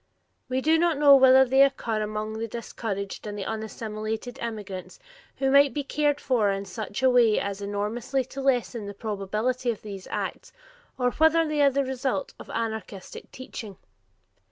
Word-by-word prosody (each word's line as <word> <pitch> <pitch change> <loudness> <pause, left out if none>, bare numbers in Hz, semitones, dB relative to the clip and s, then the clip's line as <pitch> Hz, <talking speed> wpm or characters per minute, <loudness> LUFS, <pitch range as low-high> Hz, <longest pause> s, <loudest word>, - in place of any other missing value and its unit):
We 260 +1 0
do 320 +3 +3
not 340 -3 +2
know 285 -1 +8
whether 265 0 +7
they 265 +2 +4
occur 240 -5 +2
among 215 +1 -3
the 230 - -2
discouraged 215 -3 -5
and 205 0 -5
unassimilated 220 +3 -5
immigrants 210 -5 -6 0.4
who 270 -1 0
might 280 0 +5
be 290 - -1
cared 295 +1 0
for 235 -6 +1
in 195 0 -2
such 210 +4 -6
a 260 - +6
way 235 -3 +4
as 200 0 -4
enormously 215 +6 -2
to 270 +2 -7
lessen 245 -5 0
the 200 - -7
probability 215 +5 -2
of 225 - -3
these 195 -3 -8
acts, - - -4 0.5
or 250 -1 +1
whether 320 +2 +3
they 305 -1 0
are 280 - +6
the 275 0 0
result 265 - -2
of - - -11
anarchistic 220 -4 -5
teaching. 220 -6 -8
235 Hz, 165 wpm, -26 LUFS, 210-270 Hz, 0.5 s, know